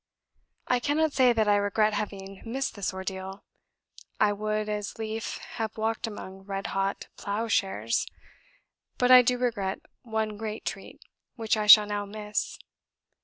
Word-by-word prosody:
I 250 Hz, -, +2 dB
cannot 295 Hz, +4 st, +1 dB
say 255 Hz, -2 st, +5 dB
that 220 Hz, -2 st, +1 dB
I 205 Hz, 0 st, +5 dB
regret 210 Hz, +1 st, +2 dB
having 195 Hz, -2 st, -5 dB
missed 260 Hz, +4 st, -3 dB
this 200 Hz, -3 st, -2 dB
ordeal; 190 Hz, +1 st, -6 dB, 0.8 s
I 205 Hz, -1 st, +4 dB
would 215 Hz, +1 st, -2 dB
as 210 Hz, -1 st, -4 dB
lief 220 Hz, 0 st, -4 dB, 0.2 s
have 220 Hz, -2 st, -3 dB
walked 225 Hz, +1 st, -1 dB
among 190 Hz, -3 st, -8 dB
red 195 Hz, 0 st, -5 dB
hot 195 Hz, 0 st, -1 dB
plough 210 Hz, +3 st, -2 dB
shares; 190 Hz, -, 0 dB, 0.9 s
but 250 Hz, 0 st, +3 dB
I 255 Hz, 0 st, +11 dB
do 250 Hz, +1 st, +1 dB
regret 215 Hz, -6 st, -1 dB, 0.2 s
one 220 Hz, -2 st, -2 dB
great 220 Hz, 0 st, -5 dB
treat, -, -, -7 dB, 0.3 s
which 225 Hz, -3 st, 0 dB
I 215 Hz, -1 st, -1 dB
shall 210 Hz, 0 st, +10 dB
now 205 Hz, 0 st, -3 dB
miss. 210 Hz, 0 st, -3 dB
215 Hz, 150 wpm, -27 LUFS, 200-225 Hz, 0.9 s, I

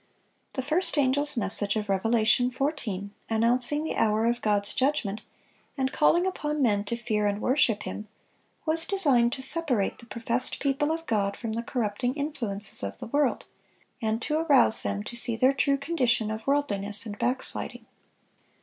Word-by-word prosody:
The 260 Hz, -, -3 dB
first 320 Hz, +5 st, +1 dB
angel's 285 Hz, +1 st, +2 dB
message 200 Hz, -1 st, +3 dB
of 215 Hz, -1 st, -2 dB
Revelation 225 Hz, +5 st, +2 dB
14, 255 Hz, -, -3 dB, 0.2 s
announcing 245 Hz, +6 st, +2 dB
the 320 Hz, -, -3 dB
hour 220 Hz, 0 st, +1 dB
of 235 Hz, +1 st, 0 dB
God's 205 Hz, -1 st, 0 dB
judgment, 255 Hz, -7 st, -1 dB, 0.6 s
and 265 Hz, -1 st, -1 dB
calling 340 Hz, +3 st, +3 dB
upon 300 Hz, -5 st, -3 dB
men 210 Hz, -7 st, +2 dB
to 235 Hz, -, -3 dB
fear 215 Hz, -3 st, -1 dB
and 205 Hz, 0 st, -1 dB
worship 235 Hz, -4 st, +1 dB
Him, 210 Hz, -, -7 dB, 0.6 s
was 325 Hz, +1 st, +2 dB
designed 275 Hz, -12 st, +3 dB
to 265 Hz, -, -5 dB
separate 265 Hz, -8 st, +2 dB
the 235 Hz, -, -14 dB
professed 235 Hz, +2 st, -1 dB
people 285 Hz, +2 st, 0 dB
of 325 Hz, 0 st, -4 dB
God 200 Hz, -5 st, -1 dB
from 230 Hz, -2 st, -5 dB
the 225 Hz, +1 st, -2 dB
corrupting 240 Hz, +1 st, -2 dB
influences 235 Hz, -9 st, -4 dB
of 100 Hz, 0 st, -5 dB
the -, -, -8 dB
world, 285 Hz, +2 st, 0 dB, 0.6 s
and 220 Hz, 0 st, -1 dB
to 305 Hz, 0 st, 0 dB
arouse 285 Hz, -, +3 dB
them 100 Hz, 0 st, -3 dB
to -, -, -7 dB
see 235 Hz, -1 st, +5 dB
their 255 Hz, +4 st, +3 dB
true 275 Hz, +1 st, +1 dB
condition 250 Hz, -7 st, 0 dB
of 220 Hz, +2 st, -7 dB
worldliness 210 Hz, -8 st, 0 dB
and 205 Hz, -2 st, -7 dB
backsliding. 255 Hz, +1 st, -2 dB
240 Hz, 165 wpm, -26 LUFS, 215-285 Hz, 0.6 s, see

